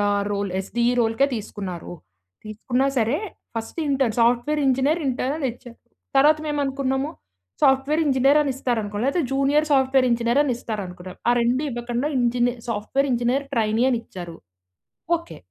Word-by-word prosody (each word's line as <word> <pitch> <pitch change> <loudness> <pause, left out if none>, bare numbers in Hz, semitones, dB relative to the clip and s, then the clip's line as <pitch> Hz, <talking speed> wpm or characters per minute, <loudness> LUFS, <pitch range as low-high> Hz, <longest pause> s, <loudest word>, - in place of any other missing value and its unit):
ఆహ్, 205 0 +1
role 200 -1 -2
SDE 235 +5 0
రోల్‌కే 225 +4 +2
తీసుకున్నారు. 195 -6 -6 0.5
తీసుకున్నా 245 +5 -1
సరే, 235 +6 +1 0.4
first 225 +8 -5
intern, 270 -5 +1
software 245 +6 +2
engineer 270 +5 +2
intern 270 +4 -2
ఇచ్చరు. 240 0 -14 0.4
తర్వాత 300 +3 +5
మేము 295 0 -1
అనుకున్నాము 270 0 -1 0.5
సాఫ్ట్‌వేర్ 270 +4 +3
ఇంజినీర్ 275 +1 +4
అని 290 -2 0
ఇస్తారనుకో 220 -6 -2
లేకపోతే 280 +6 +1
జూనియర్ 275 +3 +2
సాఫ్ట్‌వేర్ 265 -2 +3
ఇంజనీర్ 235 +3 +2
అని 285 -4 0
ఇస్తారనుకున్నాం. 185 -6 -6
ఆ - - +6
రెండు 245 +4 +1
ఇవ్వకుండా 240 +3 -2
ఇంజినీ 245 0 +2 0.2
సాఫ్ట్‌వేర్ 230 +6 -1
ఇంజినీర్ 245 +4 +1
ట్రైనీ 220 0 +1
అని 250 -3 +1
ఇచ్చారు. 175 -6 -9 0.8
ఓకే... 335 +1 -12
245 Hz, 140 wpm, -23 LUFS, 225-275 Hz, 0.8 s, ఆ